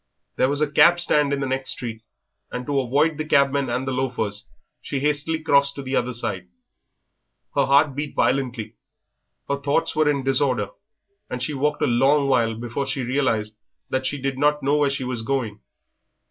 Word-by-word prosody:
There 130 Hz, -, +2 dB
was 145 Hz, +1 st, 0 dB
a 150 Hz, -1 st, +1 dB
cab 170 Hz, +4 st, +6 dB
stand 150 Hz, -4 st, +2 dB
in 140 Hz, 0 st, -1 dB
the -, -, 0 dB
next 130 Hz, 0 st, -2 dB
street, 115 Hz, -2 st, -5 dB, 0.5 s
and 125 Hz, 0 st, -5 dB
to 140 Hz, -1 st, 0 dB
avoid 145 Hz, +5 st, +1 dB
the -, -, 0 dB
cabmen 140 Hz, -3 st, +2 dB
and 125 Hz, +2 st, -2 dB
the -, -, 0 dB
loafers 120 Hz, -5 st, -2 dB, 0.3 s
she 140 Hz, -, -3 dB
hastily 150 Hz, +3 st, 0 dB
crossed 140 Hz, -2 st, +3 dB
to 140 Hz, -, -6 dB
the 135 Hz, +1 st, -3 dB
other 125 Hz, 0 st, 0 dB
side. 95 Hz, -6 st, -3 dB, 1.1 s
Her 140 Hz, -2 st, +2 dB
heart 140 Hz, +1 st, +4 dB
beat 145 Hz, +2 st, -5 dB
violently, 125 Hz, -4 st, -1 dB, 0.7 s
her 140 Hz, -, 0 dB
thoughts 140 Hz, +4 st, 0 dB
were 155 Hz, -1 st, +3 dB
in 140 Hz, -2 st, 0 dB
disorder, 130 Hz, -5 st, +1 dB, 0.6 s
and 125 Hz, 0 st, -4 dB
she 150 Hz, -, -2 dB
walked 150 Hz, +2 st, 0 dB
a -, -, +5 dB
long 135 Hz, +4 st, +3 dB
while 115 Hz, -4 st, +2 dB
before 120 Hz, +4 st, -4 dB
she 135 Hz, -1 st, -2 dB
realised 115 Hz, -5 st, -1 dB, 0.3 s
that 130 Hz, 0 st, 0 dB
she 145 Hz, -, -3 dB
did 135 Hz, 0 st, -3 dB
not 150 Hz, 0 st, +2 dB
know 145 Hz, +2 st, +2 dB
where 145 Hz, -1 st, +3 dB
she 140 Hz, -1 st, -3 dB
was 125 Hz, -2 st, -3 dB
going. 115 Hz, -4 st, -2 dB
135 Hz, 190 wpm, -23 LUFS, 125-145 Hz, 1.1 s, cab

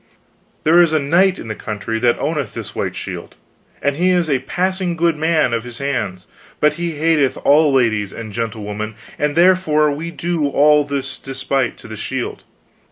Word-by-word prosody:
There 170 Hz, +3 st, +6 dB
is 165 Hz, -2 st, +3 dB
a -, -, +4 dB
knight 180 Hz, +7 st, +3 dB
in -, -, -8 dB
this 110 Hz, -, -6 dB
country 110 Hz, +1 st, -3 dB
that 120 Hz, 0 st, +2 dB
owneth 150 Hz, -8 st, -2 dB
this -, -, -6 dB
white -, -, -3 dB
shield, -, -, -7 dB, 0.5 s
and 140 Hz, 0 st, +1 dB
he 180 Hz, +2 st, +2 dB
is 175 Hz, -4 st, +2 dB
a 135 Hz, -, +2 dB
passing 185 Hz, +5 st, -1 dB
good 170 Hz, -1 st, +2 dB
man 155 Hz, -4 st, +1 dB
of 115 Hz, -1 st, -1 dB
his 120 Hz, -1 st, -8 dB
hands, 110 Hz, -10 st, -3 dB, 0.3 s
but 150 Hz, 0 st, +3 dB
he 170 Hz, +1 st, -3 dB
hateth 150 Hz, -3 st, +2 dB
all 150 Hz, +1 st, +5 dB
ladies 110 Hz, -6 st, +1 dB
and 110 Hz, -2 st, -8 dB
gentlewomen, 110 Hz, -1 st, -4 dB, 0.2 s
and 150 Hz, 0 st, 0 dB
therefore 170 Hz, -4 st, +4 dB
we 155 Hz, +4 st, -4 dB
do 170 Hz, -1 st, -1 dB
all 150 Hz, +1 st, +4 dB
this 140 Hz, -1 st, -4 dB
despite 135 Hz, -1 st, -2 dB
to -, -, -13 dB
the 110 Hz, -, -7 dB
shield. 125 Hz, +3 st, -4 dB
145 Hz, 180 wpm, -19 LUFS, 120-165 Hz, 0.5 s, There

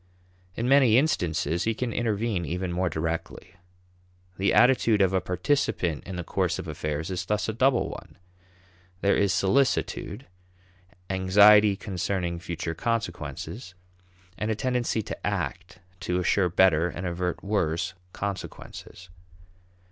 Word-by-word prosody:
In 115 Hz, -, -2 dB
many 130 Hz, -4 st, +5 dB
instances, 85 Hz, -, 0 dB
he 115 Hz, 0 st, 0 dB
can 120 Hz, 0 st, -3 dB
intervene 110 Hz, -4 st, -1 dB
even 90 Hz, +3 st, -3 dB
more 90 Hz, +1 st, 0 dB
directly. 80 Hz, +1 st, -4 dB, 0.9 s
The 100 Hz, -, +2 dB
attitude 120 Hz, -4 st, +4 dB
of 95 Hz, -1 st, +3 dB
a 95 Hz, -, +2 dB
participant 90 Hz, -, -1 dB
in 95 Hz, -, -5 dB
the 90 Hz, -, -4 dB
course -, -, -1 dB
of -, -, -6 dB
affairs 75 Hz, +3 st, -4 dB
is 90 Hz, -1 st, -2 dB
thus 105 Hz, +3 st, -1 dB
a 110 Hz, -, -2 dB
double 130 Hz, +2 st, +2 dB
one: -, -, -10 dB, 0.8 s
there 100 Hz, -, +3 dB
is 100 Hz, -1 st, +2 dB
solicitude, 105 Hz, +8 st, 0 dB, 0.9 s
anxiety 100 Hz, +2 st, +6 dB
concerning 90 Hz, -2 st, -3 dB
future 85 Hz, -1 st, -4 dB
consequences, 90 Hz, -, -4 dB, 0.6 s
and 110 Hz, -, -1 dB
a 110 Hz, -, +1 dB
tendency 120 Hz, -1 st, -1 dB
to -, -, -5 dB
act 90 Hz, +7 st, -3 dB, 0.2 s
to 90 Hz, +1 st, -1 dB
assure 90 Hz, +1 st, +2 dB
better, 85 Hz, -1 st, +3 dB
and 90 Hz, +2 st, -6 dB
avert 90 Hz, 0 st, -3 dB
worse, 90 Hz, -3 st, -1 dB, 0.2 s
consequences. 95 Hz, -2 st, -7 dB
95 Hz, 130 wpm, -26 LUFS, 85-110 Hz, 0.9 s, anxiety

